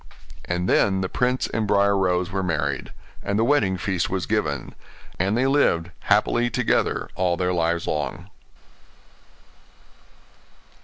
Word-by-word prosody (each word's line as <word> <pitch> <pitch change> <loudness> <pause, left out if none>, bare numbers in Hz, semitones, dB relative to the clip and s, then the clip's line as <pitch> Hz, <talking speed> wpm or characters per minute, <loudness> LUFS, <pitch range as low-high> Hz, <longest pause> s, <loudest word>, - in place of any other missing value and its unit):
And 90 +1 -2
then 95 0 +3
the 95 - -2
prince 125 +1 0
and 110 -2 -2
Briar 100 0 +3
Rose 90 -1 +1
were 95 0 -1
married, 75 -7 -2 0.3
and 100 - -1
the 110 - +3
wedding 115 -8 +2
feast 90 -1 -1
was 95 -2 -2
given; - - -2 0.5
and 100 +5 +1
they 130 - +2
lived 90 -12 +2
happily 110 +3 +2
together 125 0 0
all 90 -2 0
their 90 0 0
lives 85 0 0
long. 90 +6 -3
95 Hz, 135 wpm, -23 LUFS, 90-105 Hz, 0.5 s, then